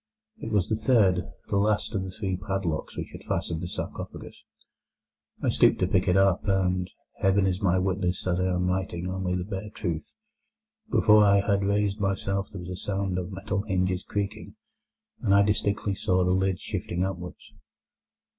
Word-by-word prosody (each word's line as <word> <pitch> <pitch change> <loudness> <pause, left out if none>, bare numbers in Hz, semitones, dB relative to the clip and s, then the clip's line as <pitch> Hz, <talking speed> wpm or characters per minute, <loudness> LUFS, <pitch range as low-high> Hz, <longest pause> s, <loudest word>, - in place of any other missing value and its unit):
It 115 - -5
was 100 -4 +2
the 110 - +1
third, 110 -6 +3 0.2
the 100 - +1
last 105 +2 +1
of 100 - 0
the 95 - -5
three 95 -1 -3
padlocks 95 -4 -3
which - - -5
had - - -10
fastened 80 -1 -2
the 90 - -3
sarcophagus. - - -6 1.1
I - - +2
stooped - - +4
to - - +1
pick 90 - +1
it 90 +1 +4
up, 95 -2 +4
and—Heaven 95 +1 0
is 95 +1 0
my 95 -2 +3
witness 95 -1 0
that 90 -1 0
I 90 0 +1
am 90 0 0
writing 90 -1 -2
only 95 -1 -2
the 90 - -1
bare 100 +1 -5
truth—before 215 - 0
I 100 -1 +5
had 100 -1 +1
raised 100 +1 +1
myself 95 0 -1
there 95 - -8
was 90 +1 -7
a - - -3
sound 95 -1 -2
of 90 +2 -5
metal 95 +1 -2
hinges 95 -3 0
creaking, 100 -1 -4 0.7
and 100 - +3
I 100 - +6
distinctly 100 0 0
saw 95 -1 +1
the 90 - +2
lid 95 0 +1
shifting 85 +1 -3
upwards. 90 -2 -6
95 Hz, 175 wpm, -27 LUFS, 90-100 Hz, 1.1 s, I